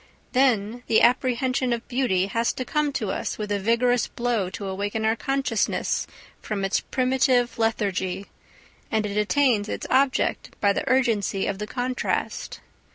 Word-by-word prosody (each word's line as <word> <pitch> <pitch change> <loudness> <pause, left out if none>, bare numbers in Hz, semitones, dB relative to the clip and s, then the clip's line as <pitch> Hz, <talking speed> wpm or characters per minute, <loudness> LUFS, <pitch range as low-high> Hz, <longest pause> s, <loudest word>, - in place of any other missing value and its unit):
Then 245 -3 +2
the 220 - +4
apprehension 255 +1 +2
of 235 0 -5
beauty 240 -8 +1
has 230 +4 0
to 255 - -4
come 300 +1 0
to 210 -6 -2
us - - -3
with 210 -1 -4
a 205 - +1
vigorous 235 +3 +2
blow 235 -6 -1
to 200 - -6
awaken 205 +3 -2
our 220 +1 +3
consciousness 265 -1 -1 0.3
from 200 -2 -2
its 195 - +1
primitive 255 -1 +1
lethargy, 195 -4 -1 0.6
and 220 -1 0
it 205 -1 -4
attains 215 0 +2
its - - -4
object 265 0 +1
by 200 -1 +3
the 275 - -2
urgency 230 -7 +1
of 200 -1 -2
the 210 - -4
contrast. 250 +2 -3
230 Hz, 155 wpm, -25 LUFS, 205-255 Hz, 0.6 s, the